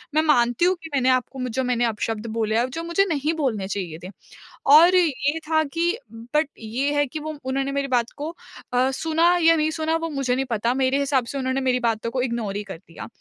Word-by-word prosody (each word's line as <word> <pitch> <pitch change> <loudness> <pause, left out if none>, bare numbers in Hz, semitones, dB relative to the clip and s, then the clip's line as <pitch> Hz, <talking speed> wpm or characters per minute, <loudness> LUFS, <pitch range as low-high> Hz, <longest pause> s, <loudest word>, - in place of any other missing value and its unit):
मैं 310 - +5
मानती 245 -1 +3
हूँ 370 +1 +3
कि 325 - -8
मैंने 260 -1 +2
आपको 255 +1 0
म 255 0 -2
जो 260 +3 -1
मैंने 245 -1 +1
अपशब्द 225 0 -3
बोले 220 -1 +1
हैं, 245 +2 0
जो 330 +6 -5
मुझे 340 +4 +2
नहीं 300 0 0
बोलने 250 -11 -1
चाहिए 180 -5 -4
थे।" 180 - -7 0.7
और 345 +4 +7
ये 305 -3 +1
था 315 -1 +3
कि 345 +5 +1 0.4
बट 305 0 +3
ये 250 +6 -2
है 290 0 +3
कि 310 +5 -6
वो 310 0 -6
उन्होंने 270 +1 -1
मेरी 280 0 -1
बात 245 -2 0
को 295 +2 -4 0.4
अ, 255 +2 +2
सुना 325 +5 +2
या 330 0 +6
नहीं 310 -1 +1
सुना, 315 0 -1
वो 330 0 -2
मुझे 275 -4 -1
नहीं 265 +1 -1
पता। 230 +1 0
मेरे 265 +1 +1
हिसाब 275 -3 +1
से 275 - -5
उन्होंने 260 0 -1
मेरी 255 -1 +1
बातों 230 -1 -1
को 255 - -1
इग्नोर 235 -5 -2
ही 205 - -3
कर 195 -4 -8
दिया, 165 -1 -11
265 Hz, 230 wpm, -23 LUFS, 235-310 Hz, 0.7 s, और